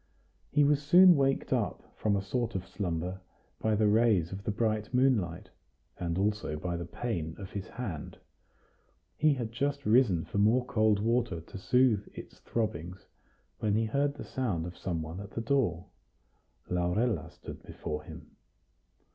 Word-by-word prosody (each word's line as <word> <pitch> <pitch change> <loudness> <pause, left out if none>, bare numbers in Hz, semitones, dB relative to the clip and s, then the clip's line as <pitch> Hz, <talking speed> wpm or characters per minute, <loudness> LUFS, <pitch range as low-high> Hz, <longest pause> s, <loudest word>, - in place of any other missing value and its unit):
He 145 0 +3
was 145 0 +3
soon 175 +4 +7
waked 135 -1 +1
up - - -1
from 105 -2 +1
a 100 - -1
sort 115 +2 -2
of 95 -1 -2
slumber 90 -1 -3 0.4
by 110 -1 +1
the 110 +1 +2
rays 105 -5 +3
of 95 +1 -7
the - - -1
bright 110 0 0
moonlight, 120 -10 +1 0.5
and 85 -1 -2
also 105 -5 0
by 85 +3 -3
the 85 -1 -5
pain 85 -8 -3
of 95 -2 -8
his 100 -2 -5
hand; 95 -12 -6 1.0
he 150 -2 +3
had 120 -4 -4
just 140 +3 -2
risen 105 -7 +4
for 100 - -3
more 115 +5 +4
cold 110 -3 +3
water 115 -4 +1
to 85 - -10
soothe 120 -2 +3
its - - -10
throbbings, 95 -5 -3 0.5
when 105 -1 +1
he 110 +1 +2
heard 140 +5 0
the - - -7
sound 105 -11 -2
of 90 0 -7
some 85 -4 -3
one 80 +4 -7
at 100 0 -7
the - - -3
door. 115 - +1 0.8
Laurella 90 0 0
stood - - -10
before 75 0 -5
him. - - -11
105 Hz, 165 wpm, -30 LUFS, 90-125 Hz, 1.0 s, soon